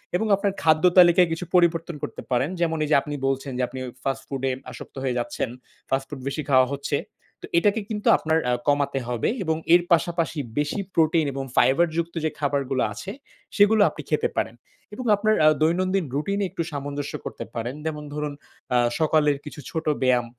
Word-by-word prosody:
এবং 220 - +1
আপনার 200 0 0
খাদ্য 155 0 +3 0.2
তালিকায় 175 0 +7
কিছু 165 +2 -3
পরিবর্তন 170 -2 +2
করতে - - -5
পারেন। 130 +5 +1
যেমন 165 -1 +1
এই - - -6
যে - - +6
আপনি 145 0 -5
বলছেন 135 0 -2
যে 130 - 0
আপনি 130 +1 -8 0.2
ফাস্ট 135 -1 -2
ফুডে 135 -1 -1 0.2
আসক্ত - - -11
হয়ে 125 -2 -1
যাচ্ছেন, 130 -1 -3 0.4
ফাস্ট 135 0 0
ফুড 140 -3 -7
বেশি 140 +3 -2
খাওয়া 130 -1 +6
হচ্ছে। 140 0 -1 0.5
তো - - -6
এটাকে 205 +4 +3
কিন্তু 210 -2 -3
আপনার 160 0 +1
আ - - +2
কমাতে 140 -1 +1
হবে 120 -2 0
এবং 160 -1 0 0.2
এর 175 - +7
পাশাপাশি 170 -1 +1 0.2
বেশি 150 +7 -1 0.2
প্রোটিন 160 -1 +3
এবং 135 0 -3
ফাইবারযুক্ত 165 +6 +2
যে - - +2
খাবারগুলো 140 -2 0
আছে 190 - -7 0.5
সেগুলো 205 +1 +5
আপনি - - -8
খেতে - - +1
পারেন। - - -1 0.4
এবং 250 +3 -6
আপনার 215 +1 +2
আ - - +8
দৈনন্দিন 185 +2 +2
রুটিনে 200 +7 -1
একটু 170 -2 -2
সামঞ্জস্য 145 0 -4
করতে - - -6
পারেন। 120 +3 -3
যেমন 150 -1 -3
ধরুন 150 -1 -3 0.4
আ - - +5 0.2
সকালের 150 -2 +3
কিছু 150 - -9
ছোট 160 -1 -3 0.2
ব্যায়াম 125 -2 +3
155 Hz, 180 wpm, -24 LUFS, 135-170 Hz, 0.5 s, আ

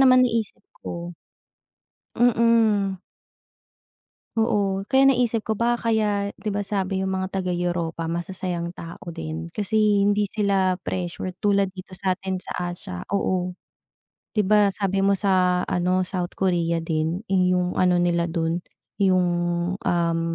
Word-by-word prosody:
naman 255 -1 +6
naisip 225 -3 -2 0.2
ko 170 0 -6 1.0
Mm. 225 -5 +3 1.4
Oo, 200 -3 +1
kaya 270 +1 +5
naisip 235 -3 +1
ko, 220 -1 -2
baka 235 -1 +1
kaya 205 -2 +1
diba 205 -1 -2
sabi 195 -1 -1
iyong 190 - -1
mga 190 0 -1
taga 185 -1 -2
Europa 175 -2 -2
masasayang 175 0 -3
tao 170 -1 -10
din, 80 - -6
kasi 210 +1 -3 0.3
hindi 205 0 +2
sila 190 -3 +1
pressured 180 +1 -4
tulad 200 -1 +3
dito 185 0 -10
sa 185 0 -1
atin 190 -1 -4
sa - - -7 0.2
Asya, 90 - -7
oo. 185 -2 0 0.8
'Diba 210 -1 +3
sabi 195 -1 0
mo 200 - +4
sa 185 -2 +2
ano, 180 +1 +1
South 180 -1 -3
Korea 170 -3 0
din 160 +2 -1
iyong 180 -1 +2
ano 180 -1 +3
nila 170 -1 +2
dun, 165 0 -2 0.3
iyong 185 -3 +3 0.5
um, 170 -3 0
190 Hz, 130 wpm, -24 LUFS, 175-205 Hz, 1.4 s, naman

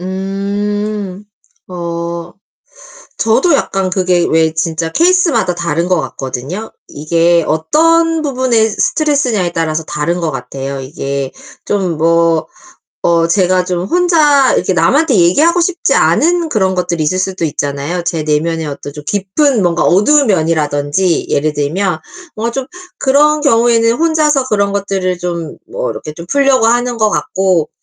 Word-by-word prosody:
음. 200 +1 -3 0.4
어 170 -1 -5 0.9
저도 250 +9 +2
약간 195 -8 -1
그게 180 -2 +1
왜 160 0 +2
진짜 160 0 -2
케이스마다 335 - +2
다른 170 0 -2
것 180 -3 +2
같거든요. 135 - -6 0.2
이게 170 +3 +1
어떤 325 - +2
부분의 255 -6 +1
스트레스냐에 250 - 0
따라서 160 -1 -1
다른 150 +5 -2
것 165 -2 -1
같아요. 135 +1 -6
이게 135 -1 -4 0.3
좀 190 -5 -1
뭐 165 0 +2 0.6
어 170 -1 +3
제가 180 +1 +2
좀 180 -1 -2
혼자 305 - +3
이렇게 - - 0
남한테 295 -4 +2
얘기하고 300 - +3
싶지 345 0 0
않은 340 +1 +2
그런 190 -8 0
것들이 170 -2 -1
있을 155 +5 0
수도 185 -2 -2
있잖아요. 145 +3 -3
제 165 -2 -2
내면의 160 +2 -1
어떤 145 0 -7
좀 150 +1 -9
깊은 210 - 0
뭔가 175 -2 +1
어두운 270 +9 +3
면이라든지 160 -1 0
예를 150 +1 0
들면 160 +5 -1 0.4
뭐 230 +2 -2
좀 270 +1 -3 0.4
그런 300 +3 +3
경우에는 230 -4 +3
혼자서 305 -3 +2
그런 200 -2 +1
것들을 195 -2 -2
좀 170 -3 -5
뭐 - - -3
이렇게 150 - -7
좀 170 +2 -10
풀려고 270 0 +2
하는 240 +1 +1
것 215 -1 +2
같고 185 -6 0
185 Hz, 290 characters per minute, -14 LUFS, 165-245 Hz, 0.9 s, 어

